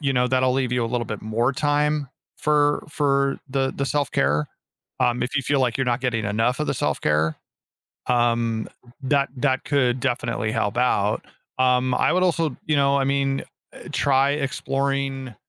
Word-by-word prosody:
you 140 -3 0
know, 125 -1 +2
that'll 130 0 +2
leave 130 -2 0
you 125 -1 +1
a - - -1
little 120 0 -2
bit 110 -2 -6
more 115 +5 0
time 145 0 0 0.3
for 145 -1 +2
for 140 -2 +1
the 135 0 0
the 140 - -1
self-care, 75 - 0 0.5
um, 120 0 +2
if 125 +3 -2
you 135 - +1
feel 140 +1 +1
like, 125 -3 +1
you're 135 - +1
not 120 +1 0
getting 115 -4 -1
enough 115 +6 0
of 150 - 0
the - - 0
self-care, 75 -6 0 0.7
um, 115 -2 +1 0.3
that 140 +1 +1
that 130 0 0
could 130 -3 +1
definitely 120 -4 -1
help 110 -1 -1
out, 105 -4 +1 0.3
um, 125 0 +2
I - - +2
would 185 - +2
also 165 -6 +1
you 150 -1 +2
know, 140 0 +3
I 135 - +1
mean, 135 0 0 0.3
uh, - - -11
try 135 0 +3
exploring 135 -2 -2
130 Hz, 175 wpm, -23 LUFS, 120-140 Hz, 0.7 s, know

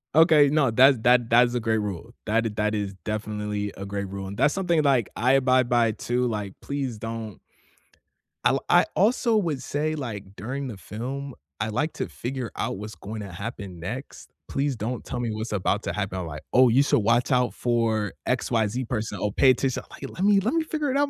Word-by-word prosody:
Okay, 155 -3 +6
no, 145 -5 +3
thats 130 +2 +6
that 120 -1 +4
that's 120 +1 +5
a 120 - 0
great 110 -1 +1
rule, 105 +3 -5
that 115 +2 +2
i - - +1
that 105 0 0
is 100 -2 -2
definitely 105 -1 -3
a 100 - -6
great 100 0 -4
rule, 100 0 -5
and 100 +1 -6
that's 145 - +3
something, 175 -5 +2
like, 135 -7 +3
I 125 +3 +3
abide 130 -2 +3
by 120 -2 +3
too, 125 +3 -1
like, 105 -4 -3
"Please 135 -5 -3
don't." 110 -2 -6 1.1
I'll - - +3
I - - +6
also 230 +2 +3
would 160 -9 -1
say, 155 +2 -1
like, 105 -8 -6
during 130 +7 -4
the 110 -6 -7
film, 130 +7 -6 0.3
I 110 +1 -1
like 145 +9 -1
to - - -3
figure 125 -2 -5
out - - -2
what's 105 -1 -7
going 105 +5 -7
to 100 -3 -7
happen 100 -2 -7
next, 120 - -7 0.2
please 140 -1 0
don't 115 +3 -4
tell 125 - -5
me 120 -2 -1
what's 110 +1 -4
about 100 +1 0
to 85 - -3
happen, 95 -2 -3
like, 75 -2 -7
"Oh, 125 -1 +6
you 130 +4 +5
should 140 - +3
watch 115 +5 +2
out 125 -1 +2
for 115 -4 0
XYZ 120 -1 0
person." 110 -4 -3
"Oh, 105 - 0
pay 130 +4 +5
attention." 130 0 -1
uh, - - -23
like, 135 - -8
"Let 185 - -5
me 200 -1 +5
let 225 - 0
me 325 -1 +2
figure 305 -3 -2
it 275 - +1
out 285 0 +2
120 Hz, 215 wpm, -25 LUFS, 105-135 Hz, 1.1 s, Okay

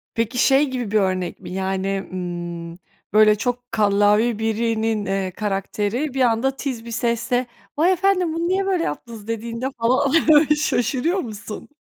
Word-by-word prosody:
Peki, 230 +2 -1
şey 270 +3 +4
gibi 245 -5 -4
bir 215 - +3
örnek 185 -2 -1
mi - - -9
yani, 190 +1 -2
ımm, 175 -1 -5 0.3
böyle, 215 0 +6
çok 245 +2 -3
kallavi 210 +1 +3
birinin, 225 -1 0
eee, 195 -1 -1
karakteri 210 +7 -2
bir 265 - -1
anda, 245 +3 +2
tiz 255 -6 -4
bir 235 - -7
sesle, 240 +2 0 0.3
"Vay 335 +5 +4
efendim 370 -2 +2
bunu 335 +1 -1
niye 385 +2 +1
böyle 370 -3 +1
yaptınız" 215 +7 -6
dediğinde 230 +2 -3
falan 255 +4 +2 0.4
şaşırıyor 300 - 0
musun? 215 - -7
230 Hz, 145 wpm, -22 LUFS, 205-260 Hz, 0.4 s, böyle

